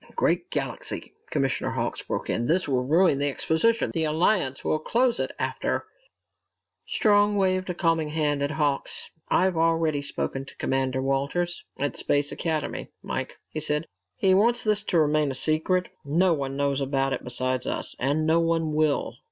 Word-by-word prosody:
"Great - - +1
galaxy," - - -4 0.2
Commissioner - - 0
Hawks - - -2
broke - - -4
in. 120 +1 -1
"This 180 +3 +2
will 130 -3 +1
ruin 160 +1 +3
the 145 0 +2
exposition! 195 +11 +1
The 160 -2 +1
Alliance 155 -3 +1
will 155 - +1
close 240 +8 +1
it - - 0
after - - -2 0.5
" - - -55
Strong 205 -1 +4
waved 185 -1 +1
a 180 - -2
calming 165 -3 +1
hand 150 -2 0
at 140 - 0
Hawks. 150 -3 -1 0.2
"I've 185 -1 +3
already 165 -2 +2
spoken 135 -1 -3
to - - -13
Commander 130 0 0
Walters 140 +6 -1
at 145 0 -2
Space 145 0 +1
Academy, 155 -3 -3
Mike," - - -4
he 155 - -3
said. 150 +1 +1 0.3
"He 190 - +3
wants 235 +5 +3
this 210 -1 +2
to 180 - +1
remain 150 -1 +3
a 135 - -3
secret. 160 +6 +1
No 170 +5 +3
one 135 -2 -3
knows 140 -1 0
about 135 0 0
it 125 - -4
besides 130 +1 -1
us, - - 0
and 145 +4 +1
no 160 +1 +4
one 165 -2 +1
will. 155 -2 0
155 Hz, 170 wpm, -26 LUFS, 140-175 Hz, 0.5 s, Strong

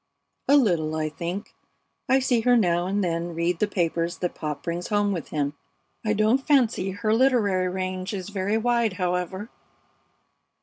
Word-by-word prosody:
"A 285 - +6
little, 170 - +2
I 155 -1 -1
think. 175 +6 -5 0.6
I 265 - +5
see 255 -3 +2
her 245 +1 +4
now 175 -4 +2
and 200 +1 0
then 170 -1 -2
read 170 +1 0
the 210 - +2
papers 170 -2 -1
that 180 - -2
Pop 150 -2 -5
brings 175 +1 -3
home 205 -1 +1
with 170 -6 -3
him. 145 -1 -2 0.5
I 215 -1 +1
don't 215 +5 +3
fancy 250 -9 +2
her 215 +3 -1
literary 220 -7 +3
range 185 +1 -3
is 195 -2 -5
very 200 +1 -1
wide, 235 -2 +1
however." 180 +3 -2
190 Hz, 165 wpm, -25 LUFS, 175-220 Hz, 0.6 s, A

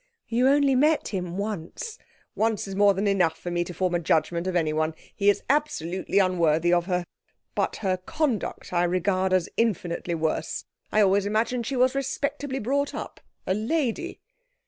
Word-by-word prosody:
'You 240 +3 +2
only 280 0 +4
met 300 +4 +3
him 180 -3 -4
once.' 205 - -5 0.3
'Once 220 -2 0
is 195 - -5
more 200 0 +5
than 195 +3 -1
enough 185 -5 +2
for 175 - -6
me 175 0 +1
to 180 - -7
form 180 +1 -1
a 175 - +2
judgement 170 +2 +1
of 185 - -1
anyone. 155 -1 +1 0.2
He 200 -1 +3
is 205 - +2
absolutely 195 - 0
unworthy 175 -3 +3
of 175 -1 +2
her. 180 -2 0 0.5
But - - 0
her 185 -1 +2
conduct 250 - -2
I 175 0 +3
regard 185 +1 +1
as 185 -2 +2
infinitely 180 -6 0
worse. 160 -1 -2 0.3
I 215 - +4
always 200 0 +3
imagined 230 +3 0
she 275 - -2
was 255 +1 +3
respectably 275 0 -2
brought 280 +4 -1
up - - -6 0.3
a 185 - +1
lady!' 265 - -1
195 Hz, 170 wpm, -26 LUFS, 175-250 Hz, 0.5 s, more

